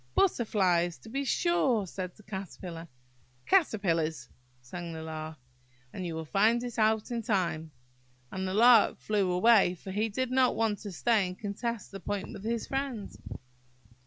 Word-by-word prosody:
"Butterflies, 185 - +2
to 225 - -14
be 275 +4 -2
sure," 270 - +2
said 185 0 -6
the 215 - -18
Caterpillar. 185 -4 -7 0.6
"Caterpillars! 165 - +1 0.2
" 125 0 -36
sang 170 +6 -7
the 160 0 -6
Lark; 155 0 -6 0.6
"and 185 - -5
you'll 160 -1 -4
find 220 +8 +2
it 240 -2 -5
out 220 +2 +2
in 235 -1 -1
time;" 180 -8 -1 0.6
and 190 0 -3
the 185 - -2
Lark 235 0 +6
flew 200 -4 0
away, 195 -1 +5
for 190 +2 -9
he 215 +3 0
did 255 +4 -2
not 255 -1 +3
want 220 -2 0
to 205 - -7
stay 210 +2 +2
and 180 0 -7
contest 215 +2 -4
the 195 - -7
point 200 +1 -4
with 195 - -9
his 230 +1 -2
friend. 270 -6 -3
200 Hz, 160 wpm, -29 LUFS, 175-230 Hz, 0.6 s, Lark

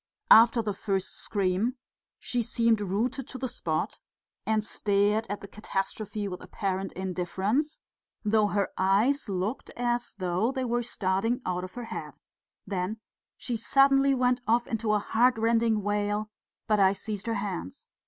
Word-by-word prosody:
After 230 +1 +8
the 210 -1 -1
first 195 -1 -1
scream 200 +5 0 0.4
she 245 - -1
seemed 230 -1 +2
rooted 230 +7 -1
to 260 - -7
the 260 - -2
spot, 160 -9 -2 0.5
and 215 -1 +1
stared 205 +1 +1
at 205 - -4
the 200 - -8
catastrophe 205 +1 -3
with 180 -1 -6
apparent 190 +1 -3
indifference, 190 - -1 0.5
though 215 0 +3
her 200 -1 0
eyes 210 +8 +2
looked 195 +6 -2
as 240 0 -1
though 185 +5 0
they 260 -1 -2
were 240 0 0
starting 225 +1 0
out 180 0 -1
of 185 - -8
her 245 -1 -5
head; - - -7 0.5
then 190 +2 -2 0.4
she 245 - -3
suddenly 275 +4 +4
went 250 0 +2
off 235 +2 +3
into 225 -1 -1
a - - +4
heart 235 +4 +2
rending 225 -1 +2
wail, 205 +1 -1 0.3
but 215 -1 +2
I 190 0 +5
seized 205 +1 -5
her 230 - 0
hands. 200 +6 -5
215 Hz, 155 wpm, -28 LUFS, 195-240 Hz, 0.5 s, After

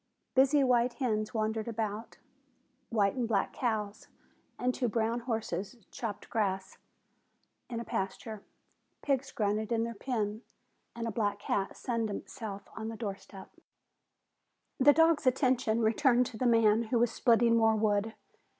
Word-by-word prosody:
Busy 275 +2 +5
white 245 -1 +3
hens 215 -5 -1
wandered 220 0 -1
about. 220 -1 -4 0.7
White 205 -4 +2
and 245 -3 -1
black 200 -4 0
cows 215 -3 -2 0.5
and 250 0 0
two 250 - -1
brown 230 +2 0
horses 220 -4 -3 0.2
cropped 220 -4 -5
grass 190 -4 -2 0.9
in 235 -2 -3
a - - -4
pasture. 205 +2 -4 0.6
Pigs 275 -1 0
grunted 215 +1 -1
in 225 -1 +2
their 230 0 -3
pen 220 -2 -3 0.5
and 230 0 -3
a - - -2
black 205 -2 0
cat 195 -1 -2
sunned 230 -3 -2
itself 205 -1 -6
on 220 0 -5
the 225 0 -5
door 205 -4 -3
step. 195 0 -13 1.3
The 280 +2 +8
dog's 325 -2 +3
attention 250 -3 +2
returned 245 +2 +3
to 235 -2 -7
the 255 - +2
man 225 -1 +4
who 235 +2 0
was 235 0 +3
splitting 230 -1 +3
more 225 -1 +4
wood. 215 0 +1
225 Hz, 145 wpm, -31 LUFS, 210-245 Hz, 1.3 s, The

